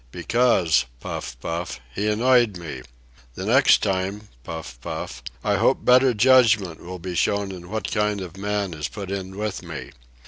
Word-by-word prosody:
"Because"—puff, 75 Hz, -, 0 dB
puff—"he 85 Hz, +1 st, -4 dB
annoyed 115 Hz, -1 st, +3 dB
me. 80 Hz, -7 st, -7 dB, 0.5 s
The -, -, -5 dB
next -, -, +5 dB
time"—puff, 95 Hz, -, -4 dB
puff—"I -, -, -4 dB
hope -, -, +2 dB
better 125 Hz, 0 st, +5 dB
judgment 110 Hz, -7 st, +4 dB
will 90 Hz, +1 st, -7 dB
be 90 Hz, +1 st, -6 dB
shown 100 Hz, +2 st, 0 dB
in 90 Hz, -1 st, -9 dB
what 110 Hz, -2 st, -3 dB
kind 105 Hz, -1 st, 0 dB
of 90 Hz, -3 st, -7 dB
a -, -, -12 dB
man 100 Hz, -2 st, -1 dB
is 75 Hz, -1 st, -3 dB
put 100 Hz, -2 st, -7 dB
in 95 Hz, -1 st, -5 dB
with 105 Hz, -2 st, -3 dB
me. -, -, -8 dB
95 Hz, 145 wpm, -23 LUFS, 80-105 Hz, 0.5 s, next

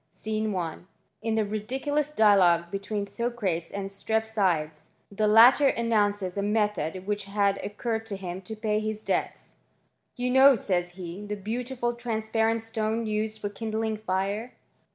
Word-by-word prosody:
scene 215 Hz, 0 st, -3 dB
1, 175 Hz, -2 st, -4 dB, 0.3 s
in 225 Hz, -1 st, -1 dB
the 220 Hz, -1 st, +1 dB
ridicu 240 Hz, +8 st, -3 dB
3 300 Hz, 0 st, +3 dB
dialogue 180 Hz, -5 st, +4 dB
between 200 Hz, +1 st, -3 dB
Socrates 205 Hz, -7 st, -2 dB
and 200 Hz, -1 st, -4 dB
Strepsiades, 195 Hz, -7 st, -1 dB, 0.2 s
the 215 Hz, +2 st, 0 dB
er 240 Hz, +6 st, +7 dB
announces 205 Hz, -5 st, +1 dB
a -, -, +1 dB
method 205 Hz, -4 st, -1 dB
which 205 Hz, 0 st, -2 dB
had 200 Hz, 0 st, +1 dB
occurred 225 Hz, +1 st, -3 dB
to 205 Hz, -, -3 dB
him 185 Hz, -1 st, -6 dB, 0.2 s
>ay 215 Hz, -1 st, +1 dB
his 215 Hz, 0 st, -3 dB
debts. -, -, -3 dB, 0.3 s
" -, -, -46 dB
You 250 Hz, 0 st, -1 dB
know," 265 Hz, +1 st, +7 dB
says 180 Hz, -4 st, -1 dB
he, 180 Hz, +1 st, -7 dB
" -, -, -10 dB
the 210 Hz, 0 st, -3 dB
beautiM 240 Hz, +6 st, -4 dB
laparent 225 Hz, -1 st, 0 dB
stone 225 Hz, 0 st, -2 dB
used 215 Hz, 0 st, -2 dB
for 205 Hz, -, -3 dB
kindling 220 Hz, +1 st, -2 dB
fire." 205 Hz, +3 st, -2 dB
215 Hz, 155 wpm, -27 LUFS, 195-225 Hz, 0.3 s, er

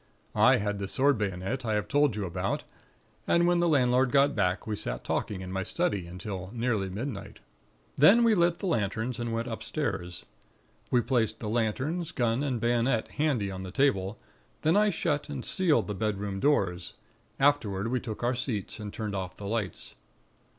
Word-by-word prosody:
I -, -, +6 dB
had 105 Hz, 0 st, -2 dB
the 100 Hz, -, -3 dB
sword 135 Hz, +2 st, +2 dB
bayonet 100 Hz, +6 st, -2 dB
I 110 Hz, -2 st, 0 dB
have 105 Hz, -, -1 dB
told 145 Hz, -5 st, +3 dB
you 105 Hz, -2 st, -2 dB
about; 85 Hz, -, -2 dB, 0.6 s
and 170 Hz, 0 st, +4 dB
when 175 Hz, 0 st, +3 dB
the 175 Hz, -, +3 dB
landlord 130 Hz, -3 st, +3 dB
got 140 Hz, 0 st, +4 dB
back, 90 Hz, -3 st, 0 dB
we 110 Hz, -, -2 dB
sat -, -, -3 dB
talking 95 Hz, -3 st, -2 dB
in 95 Hz, 0 st, -6 dB
my 95 Hz, 0 st, -2 dB
study 100 Hz, -, -1 dB
until 95 Hz, +1 st, -6 dB
nearly 115 Hz, -5 st, 0 dB
midnight. 110 Hz, +2 st, -6 dB, 0.6 s
"Then 200 Hz, -, +7 dB
we 230 Hz, -1 st, +5 dB
lit 170 Hz, -3 st, +3 dB
the -, -, -5 dB
lanterns 115 Hz, -, -1 dB
and 120 Hz, -1 st, -2 dB
went 115 Hz, +1 st, -2 dB
upstairs. 105 Hz, -, -4 dB, 0.6 s
We 120 Hz, -, +3 dB
placed 115 Hz, -4 st, 0 dB
the 105 Hz, -, -4 dB
lanterns, 130 Hz, +10 st, -1 dB
gun 120 Hz, -2 st, 0 dB
and 135 Hz, -5 st, -1 dB
bayonet 120 Hz, 0 st, +1 dB
handy 135 Hz, -10 st, 0 dB
on 95 Hz, 0 st, -6 dB
the 95 Hz, -, -6 dB
table; 100 Hz, -3 st, +1 dB, 0.5 s
then 160 Hz, +3 st, +3 dB
I 210 Hz, +1 st, +5 dB
shut 150 Hz, -5 st, -1 dB
and 135 Hz, -4 st, -5 dB
sealed 180 Hz, -5 st, +2 dB
the 105 Hz, -, -4 dB
bedroom 100 Hz, -1 st, -2 dB
doors; 95 Hz, -10 st, +1 dB, 0.5 s
afterward 115 Hz, -8 st, +2 dB
we 125 Hz, +1 st, 0 dB
took 115 Hz, -2 st, -6 dB
our 120 Hz, +1 st, +2 dB
seats, 120 Hz, -5 st, -3 dB
and 105 Hz, -1 st, -6 dB
turned 105 Hz, -1 st, -4 dB
off 95 Hz, -1 st, -4 dB
the 100 Hz, -, -8 dB
lights. 105 Hz, -2 st, -3 dB
115 Hz, 180 wpm, -28 LUFS, 100-140 Hz, 0.6 s, Then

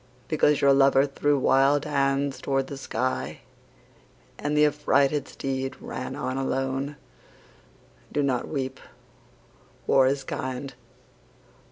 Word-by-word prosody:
Because 150 Hz, -2 st, +2 dB
your 140 Hz, 0 st, +6 dB
lover 135 Hz, 0 st, +5 dB
threw 145 Hz, +1 st, +1 dB
wild 135 Hz, +2 st, +3 dB
hands 140 Hz, -1 st, 0 dB
toward 135 Hz, -1 st, 0 dB
the 140 Hz, -, -7 dB
sky 125 Hz, -, -3 dB, 1.0 s
And 150 Hz, +1 st, -1 dB
the 150 Hz, -, +6 dB
affrighted 145 Hz, -1 st, +2 dB
steed 135 Hz, -1 st, -4 dB
ran -, -, -6 dB
on 130 Hz, +1 st, -3 dB
alone, 135 Hz, +2 st, -2 dB, 1.2 s
Do 145 Hz, -, 0 dB
not 130 Hz, -3 st, 0 dB
weep. 130 Hz, -3 st, -4 dB, 1.1 s
War 130 Hz, -1 st, +4 dB
is 135 Hz, 0 st, 0 dB
kind. 130 Hz, +1 st, -5 dB
135 Hz, 115 wpm, -26 LUFS, 135-145 Hz, 1.2 s, your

